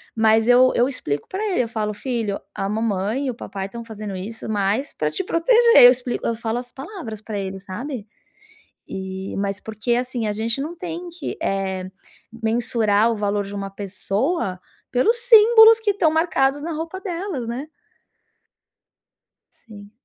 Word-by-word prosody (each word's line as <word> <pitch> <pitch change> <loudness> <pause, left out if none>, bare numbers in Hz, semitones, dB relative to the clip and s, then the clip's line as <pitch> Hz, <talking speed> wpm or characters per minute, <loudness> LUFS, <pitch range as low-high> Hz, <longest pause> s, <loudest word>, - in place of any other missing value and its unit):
mas 220 0 +3
eu 250 +1 +6
eu 245 - +3
explico 145 - -3
para 390 +3 -4
ele, 305 - +2
eu - - -4
falo: 215 -2 -2
"Filho, 225 -3 -3 0.2
a 195 - -2
mamãe 215 +4 -1
e - - 0
o - - -10
papai 195 -4 -6
estão 235 +4 -8
fazendo 215 -3 -7
isso 210 +5 -6
mais 210 +6 0
para - - -1
te 385 - -2
proteger", 465 - +5
eu 245 - +11
explico 250 -1 -3
eu 230 - +1
falo 225 +1 -2
as 245 0 -10
palavras 270 - -8
para 215 -1 -5
ele, 195 -1 -4
sabe, 220 +4 -6 0.8
e 190 0 -6
mas 200 0 -2
porque 220 +3 -2
assim 245 -2 -2
a 210 - 0
gente 225 +5 -2
não 310 +5 -4
tem 345 0 -6
que, 340 -2 -6
eh, 190 -1 -1 0.6
mensurar 225 -1 +2
o - - -3
valor 205 -1 -1
de 200 +1 -8
uma 195 -1 -4
pessoa 200 - -2 0.3
pelos 425 - +2
símbolos 455 -1 +7
que 440 -2 +1
estão 350 -5 +2
marcados 300 -4 +1
na 330 +3 -4
roupa 325 +4 -5
delas, 355 - -4
né. 250 +6 -5 1.8
Sim. 205 -3 -14
230 Hz, 170 wpm, -22 LUFS, 205-300 Hz, 1.8 s, eu